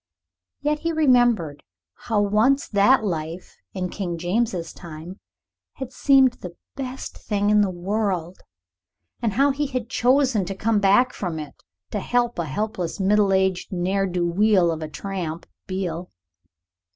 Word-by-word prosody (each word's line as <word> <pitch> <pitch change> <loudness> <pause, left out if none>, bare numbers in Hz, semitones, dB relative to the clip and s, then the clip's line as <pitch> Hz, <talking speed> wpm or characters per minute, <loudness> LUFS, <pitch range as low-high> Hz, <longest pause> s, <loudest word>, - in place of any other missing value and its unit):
Yet 295 +1 0
he 335 +1 -1
remembered 245 - +3 0.3
how 215 -3 -1
once 225 +8 +2
that 215 +4 +4
life, 165 -2 -4 0.2
in 180 -1 -2
King 175 -4 -4
James's 180 -1 -1
time, 170 +3 -10 0.5
had 265 -1 -7
seemed 265 -1 +5
the 175 -1 -8 0.2
best 265 -1 -6
thing 205 -1 -1
in 210 0 +5
the 200 - +2
world, 185 -1 -2 0.8
and 225 -4 0
how 275 +5 +3
he 290 +2 -1
had 250 -4 -4
chosen 255 -3 +3
to 195 +2 -5
come 215 +2 +1
back 205 +6 +4
from 175 -5 -4
it, 150 -2 -7 0.4
to 210 - -1
help 240 0 0
a 170 - 0
helpless 180 - -3
middle 200 +1 +3
aged 190 -1 +1
ne'er 190 +2 0
do 175 -1 -1
weel 185 -1 +3
of 160 -1 -4
a 155 - -3
tramp 170 -2 -5 0.2
Beale. 180 -2 -3
200 Hz, 150 wpm, -23 LUFS, 175-240 Hz, 0.8 s, seemed